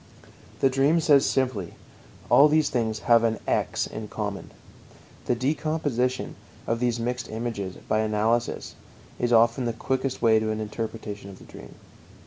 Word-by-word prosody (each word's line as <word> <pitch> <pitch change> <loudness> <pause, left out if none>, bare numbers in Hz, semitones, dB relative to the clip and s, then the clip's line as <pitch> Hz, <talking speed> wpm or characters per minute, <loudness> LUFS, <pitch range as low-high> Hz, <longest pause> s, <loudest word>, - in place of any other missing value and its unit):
The 135 - +5
dream 140 +5 +3
says 145 -3 +4
simply: 125 -10 -1 0.5
All 145 - +7
these 155 0 +2
things 110 -3 -1
have 115 -1 +4
an 115 -1 +1
"x" - - 0
in 110 -1 -7
common. 105 -2 -5 0.8
The 125 - +2
decomposition 135 -2 -1 0.3
of 115 0 -1
these 120 -1 0
mixed 125 +2 -3
images 110 -4 -4
by 110 - +1
analysis 110 +2 0 0.5
is 120 0 0
often 115 +2 +4
the 115 - -1
quickest 130 +3 -2
way 110 -2 +4
to 110 0 -2
an 110 0 -2
interpretation 110 -2 -6
of 95 - -11
the - - -15
dream. - - -13
115 Hz, 150 wpm, -25 LUFS, 110-130 Hz, 0.8 s, All